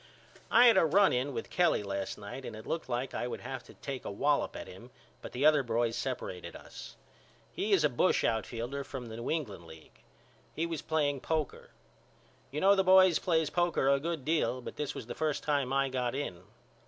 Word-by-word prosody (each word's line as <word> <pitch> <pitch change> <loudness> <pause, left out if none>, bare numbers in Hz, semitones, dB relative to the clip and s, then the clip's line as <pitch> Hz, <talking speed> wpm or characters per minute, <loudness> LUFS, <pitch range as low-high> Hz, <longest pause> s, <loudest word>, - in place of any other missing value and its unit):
I 240 +2 +7
had 235 - +7
a - - +6
run 195 +5 +4
in 130 +3 0
with - - -5
Kelly 175 -11 +2
last 100 -1 -4
night 105 +6 -8
and 110 - -7
it 110 - -10
looked 165 -4 -3
like 125 +2 -2
I 120 - -2
would - - -6
have 130 +2 -5
to - - -15
take 135 -2 -6
a - - -5
wallop 140 +8 0
at - - -7
him - - -12 0.3
but - - -8
the 130 +4 -1
other 155 -2 +6
boys 115 -2 0
seperated 120 -7 -4
us. - - -10 0.6
He 210 - -2
is 190 -6 +4
a - - +6
bush 145 +7 +2
outfielder 120 +4 -2
from 130 -4 -7
the 110 - -7
New 115 - -5
England 110 - -3
League. 80 -1 -15 0.5
We 165 - 0
was 165 -2 -4
playing 145 -3 0
poker. 155 -3 -2 0.8
You 150 - -4
know 195 +1 +6
the 195 -1 +3
boys 185 -2 +6
plays 160 -4 +1
poker 175 -6 +1
a 140 0 +4
good 160 -2 -4
deal 155 -5 +1
but 125 - -8
this 150 - -4
was - - -6
the 120 - -6
first 155 -2 -1
time 140 -4 0
I 135 0 +2
got 125 -2 -2
in. 95 -11 -5
140 Hz, 215 wpm, -31 LUFS, 120-160 Hz, 0.8 s, I